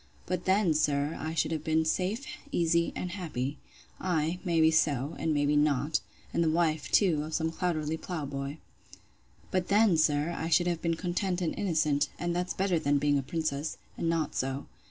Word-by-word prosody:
But 180 0 -3
then, 190 -3 +3
sir, 150 0 +1
I 160 +1 -3
should 165 - +1
have 155 -2 -2
been 160 0 +2
safe, 195 - -1 0.3
easy, 170 - +2
and 180 - -3
happy.—Ay, 160 +1 -3
may 170 -4 +1
be 160 0 +6
so, 145 -3 +1
and 160 - 0
may 145 -1 +2
be 145 +1 +2
not; 145 0 +2 0.3
and 170 - +2
the 160 - +2
wife, 160 -2 +1
too, 175 -8 +4
of 155 +1 -4
some 160 0 0
clouterly 160 -2 -1
plough 160 -3 -4
boy. 140 +1 -4 0.9
But 185 -1 0
then, 205 -3 +4
sir, 150 +1 +2
I 165 - -3
should 175 +1 +4
have 175 -2 -1
been 165 -1 0
content 180 +1 -1
and 175 -3 -1
innocent; 155 -6 +1
and 175 0 -2
that's 180 +1 -2
better 185 -3 +1
than 145 -1 +2
being 145 0 +2
a - - -1
princess, 155 +1 -2 0.2
and 165 - -1
not 165 -3 0
so. 135 +2 -2
160 Hz, 190 wpm, -29 LUFS, 150-175 Hz, 0.9 s, be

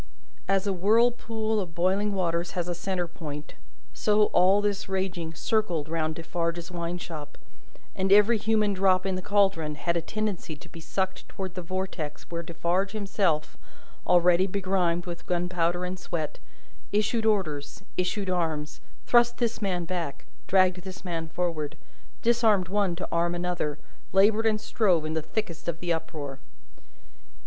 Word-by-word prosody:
As 195 0 +2
a 200 - +1
whirlpool 220 +2 +2
of 175 -4 -5
boiling 190 +4 +2
waters 170 -2 0
has 175 -1 0
a 175 - -1
centre 180 0 -2
point, 150 -3 -7 0.4
so, 210 0 +3
all 185 +3 +5
this 205 -1 -1
raging 180 -4 -2
circled 175 -7 0
round 160 -1 -1
Defarge's 170 +1 -3
wine 170 0 -3
shop, 155 -4 -8 0.6
and 190 0 0
every 210 +3 +6
human 215 -1 +2
drop 185 -1 +3
in 190 - 0
the 185 - -2
caldron 190 -6 +2
had 170 +3 -1
a 170 - +1
tendency 205 -4 -3
to 145 - -14
be 165 - -11
sucked 190 +3 -3
towards 190 -3 -5
the 185 - -4
vortex 185 -4 -4
where 170 0 -2
Defarge 170 +4 -1
himself, 195 -7 0 0.5
already 180 +1 +5
begrimed 185 -3 0
with 175 -1 -7
gunpowder 175 0 0
and 180 +1 -4
sweat, 160 -4 -4 0.5
issued 220 +2 +1
orders, 155 -10 -1
issued 190 +2 -1
arms, 160 -4 -2 0.2
thrust 240 0 +4
this 230 -2 -1
man 180 -4 0
back, 165 -5 -4 0.2
dragged 185 -1 +4
this 190 +1 -9
man 165 -2 -3
forward, 160 -3 -2 0.5
disarmed 225 -6 +3
one 200 -3 +1
to 180 - -4
arm 170 +1 +1
another, 175 -4 -1 0.4
laboured 210 +3 +5
and 215 -1 +2
strove 185 -8 +2
in 155 - -2
the 160 - 0
thickest 170 -1 -4
of 170 -1 -2
the 175 -1 0
uproar. 150 -4 -5
180 Hz, 155 wpm, -27 LUFS, 170-200 Hz, 0.6 s, every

